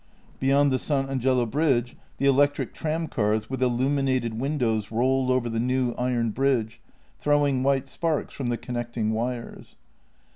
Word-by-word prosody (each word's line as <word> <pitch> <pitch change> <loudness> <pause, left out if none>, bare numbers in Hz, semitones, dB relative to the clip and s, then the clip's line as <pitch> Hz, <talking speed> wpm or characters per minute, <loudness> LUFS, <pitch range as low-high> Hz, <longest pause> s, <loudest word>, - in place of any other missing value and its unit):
Beyond 140 +1 +3
the 130 - +1
San 135 -1 0
Angelo 130 -2 +1
bridge 125 -1 +1 0.2
the 140 - -1
electric 145 +1 +2
tramcars 125 -9 -1
with 130 -1 -3
illuminated 130 -1 +1
windows 120 -7 -1
rolled 130 +3 +1
over 130 -2 +1
the 115 -1 -2
new 125 +1 +1
iron 120 -2 -1
bridge, 115 -3 0 0.4
throwing 145 -3 +2
white 135 0 +1
sparks 165 -3 -2
from 130 -3 -3
the 120 - 0
connecting 120 -3 -3
wires. 120 +2 -4
130 Hz, 140 wpm, -25 LUFS, 120-140 Hz, 0.4 s, Beyond